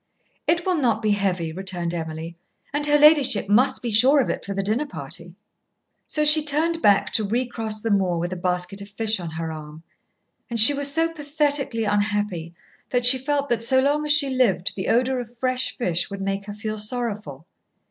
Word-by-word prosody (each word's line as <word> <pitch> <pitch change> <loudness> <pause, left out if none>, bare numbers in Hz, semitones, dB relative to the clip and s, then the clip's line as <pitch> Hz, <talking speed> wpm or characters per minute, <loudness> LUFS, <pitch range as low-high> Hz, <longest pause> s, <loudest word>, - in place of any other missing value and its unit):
"It 340 +1 +1
will 370 -2 +1
not 230 -6 0
be 215 - +2
heavy," 185 -5 -1
returned 180 -2 -3
Emily; 160 0 -6 0.4
"and 290 0 +1
her 295 0 +4
ladyship 295 -9 +4
must 235 +8 +2
be 235 - -2
sure 255 +7 +4
of 265 - +1
it - - -5
for 200 - -5
the 195 - -1
dinner 225 +9 -1
party." - - -8 0.7
So 300 -1 -1
she 300 +1 +6
turned 320 +3 0
back 200 -1 +3
to 220 - +1
recross 225 -1 -3
the 225 - -1
moor 190 -4 +1
with 175 +2 -3
a - - -5
basket 180 +2 -2
of 200 - -9
fish 215 0 -1
on 170 -2 -6
her 160 0 -5
arm. 155 0 -10 0.7
And 235 -1 -2
she 225 +7 +9
was 285 0 -1
so 325 +2 0
pathetically 290 -5 -1
unhappy 205 -5 -2 0.3
that 245 -1 0
she 260 +1 +6
felt 285 +1 -1
that 235 -2 0
so 260 +3 +3
long 290 +3 +1
as 300 - +1
she 290 -2 +4
lived 215 -9 +1
the 190 - -4
odour 255 +2 +1
of 240 0 -9
fresh 255 +1 -1
fish 180 -7 -1
would 200 -1 -7
make 195 0 -3
her 205 - -7
feel 215 0 -5
sorrowful. 210 - -4
220 Hz, 200 wpm, -23 LUFS, 195-275 Hz, 0.7 s, she